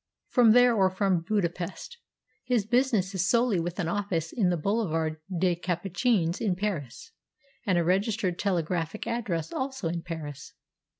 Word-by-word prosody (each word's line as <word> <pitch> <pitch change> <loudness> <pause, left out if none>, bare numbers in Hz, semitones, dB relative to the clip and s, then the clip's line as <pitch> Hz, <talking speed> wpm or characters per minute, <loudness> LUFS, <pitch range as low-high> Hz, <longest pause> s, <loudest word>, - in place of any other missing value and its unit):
"From 235 -4 +6
there 245 0 +6
or 195 -4 +3
from 190 -2 +1
Budapest. 185 - -3 0.4
His 240 -5 +1
business 225 -5 +1
is 190 0 0
solely 235 -5 +3
with 175 +2 -3
an 170 - 0
office 175 -4 -2
in 200 -7 +2
the 175 - +1
Boulevard 165 -4 -1
des 180 -1 +1
Capucines 180 +1 0
in 200 -5 +1
Paris, 180 - -4 0.6
and 185 -3 +3
a 170 - +3
registered 190 +1 0
telegraphic 175 -1 -1
address 215 -9 -2
also 265 -9 -3
in 170 0 -3
Paris." 160 -5 -7
185 Hz, 145 wpm, -28 LUFS, 170-220 Hz, 0.6 s, From